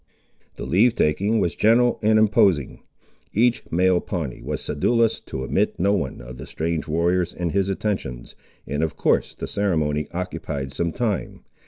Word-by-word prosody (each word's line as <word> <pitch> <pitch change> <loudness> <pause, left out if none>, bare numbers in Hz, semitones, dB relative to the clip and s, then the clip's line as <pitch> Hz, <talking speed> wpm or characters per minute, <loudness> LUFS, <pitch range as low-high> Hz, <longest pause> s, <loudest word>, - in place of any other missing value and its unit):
The - - -6
leave 105 - +3
taking 100 +8 +1
was 85 -5 0
general 120 +3 +3
and 110 0 +4
imposing. 100 -8 +3 0.5
Each 120 +3 +3
male 90 +1 +3
Pawnee 80 -9 -4
was - - -4
sedulous 115 +10 +1
to 65 - -4
omit - - 0
no 100 +3 +3
one 95 -10 -2
of - - -10
the - - -8
strange 80 0 -3
warriors 85 +2 +1
in 85 -2 -2
his 100 0 +1
attentions, 95 - -3 0.3
and 75 +2 -2
of 80 -1 -1
course - - +1
the - - -5
ceremony 75 -7 0
occupied 80 -6 -4
some 85 +3 -1
time. 110 -3 -3
90 Hz, 160 wpm, -23 LUFS, 75-105 Hz, 0.5 s, and